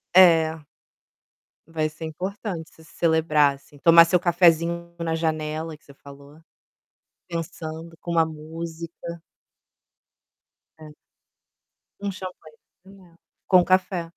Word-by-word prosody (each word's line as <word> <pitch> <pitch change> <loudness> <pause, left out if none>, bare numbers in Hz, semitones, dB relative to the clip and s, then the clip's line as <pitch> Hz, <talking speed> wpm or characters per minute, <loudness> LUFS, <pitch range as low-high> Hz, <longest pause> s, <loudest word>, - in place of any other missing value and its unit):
É 165 -4 +5 1.0
vai 160 -1 -1
ser 155 +1 -9
importante 180 +1 -5
você 160 - -19
se 160 - -19
celebrar, 155 -4 +3
assim, 145 +1 -20
tomar 165 +2 +8
seu 180 +1 +2
cafezinho 170 -1 +2
na 165 -1 -1
janela, 155 0 -3
que - - -32
você 140 - -15
falou, 140 +2 -15 0.9
pensando, 165 -1 -6
com 175 - -7
uma 165 -1 +3
música. 165 +2 -8 1.6
É. 155 -1 -12 1.1
Um 200 -1 -2
champanhezinho, 185 +1 -13 0.3
com 185 -2 +6
café. 185 -2 0
165 Hz, 105 wpm, -24 LUFS, 155-170 Hz, 1.6 s, tomar